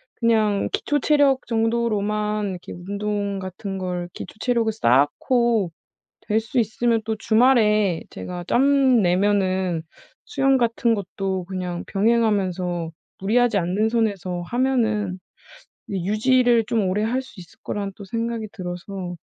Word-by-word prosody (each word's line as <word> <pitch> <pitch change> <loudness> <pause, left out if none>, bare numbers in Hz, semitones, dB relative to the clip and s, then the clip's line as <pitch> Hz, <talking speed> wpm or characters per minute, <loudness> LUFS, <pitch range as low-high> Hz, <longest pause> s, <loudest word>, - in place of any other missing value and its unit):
그냥 215 -3 +2
기초 290 0 0
체력 280 -2 +3
정도로만 215 -2 0
이렇게 180 -1 -8
운동 200 +2 -3
같은 190 +1 -6
걸 180 -2 -4
기초 185 - -9
체력을 235 -2 +1
쌓고 200 - +2 0.6
될 215 - +3
수 225 +3 -3
있으면 225 +1 0
또 220 0 -2
주말에 215 -5 +3
제가 180 -1 -7
짬 270 -1 +4
내면은 185 -2 +1 0.4
수영 270 -1 +2
같은 235 -1 +1
것도 190 -2 -3
그냥 180 -2 -4
병행하면서 195 -6 +1 0.3
무리하지 220 +2 +2
않는 190 +5 0
선에서 200 -6 -1
하면은 220 -7 0 0.7
유지를 225 +5 +2
좀 215 -4 0
오래 195 +3 0
할 250 +4 0
수 250 -5 -14
있을 175 - -14
거라는 200 -1 -4
또 205 - -10
생각이 230 +1 -3
들어서 180 0 -6
210 Hz, 265 characters per minute, -23 LUFS, 185-235 Hz, 0.7 s, 짬